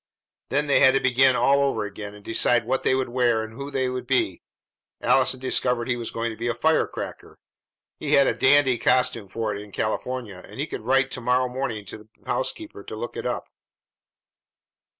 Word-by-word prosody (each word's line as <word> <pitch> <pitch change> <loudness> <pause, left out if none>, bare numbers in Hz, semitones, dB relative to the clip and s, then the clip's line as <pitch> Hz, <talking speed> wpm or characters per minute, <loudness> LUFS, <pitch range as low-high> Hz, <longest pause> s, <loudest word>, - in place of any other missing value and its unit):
Then 145 +2 +1
they 145 - +3
had 130 -1 +6
to - - +4
begin 130 0 +4
all 140 +2 +3
over 135 -6 0
again, 105 0 -7
and 105 - -15
decide 115 +1 +2
what 130 +3 0
they 130 - +2
would 130 -2 -1
wear 120 -2 +1
and 110 0 -9
who 140 +4 -7
they 135 -2 -1
would 125 -1 -4
be. 110 -9 0 0.6
Allison 130 -1 +2
declared 125 -2 0
he 125 - +1
was 120 -1 -5
going 115 0 -3
to - - -8
be 115 +2 -4
a 120 - -1
firecracker; 160 0 -1 0.6
he - - -1
had 140 - +6
a - - +2
"dandy" 135 -2 +4
costume 115 -4 +2
for 110 0 -2
it 100 - -6
in 105 0 -12
California, 110 -2 -3
and - - -12
he 145 - -1
would - - -4
write 135 +3 +2
to 125 - -4
morrow 125 +1 +2
morning 125 -5 -4
to 100 - -8
the 105 0 -18 0.2
housekeeper - - -4
to - - -8
look - - -6
it - - -3
up. - - -3
125 Hz, 205 wpm, -24 LUFS, 115-130 Hz, 0.6 s, had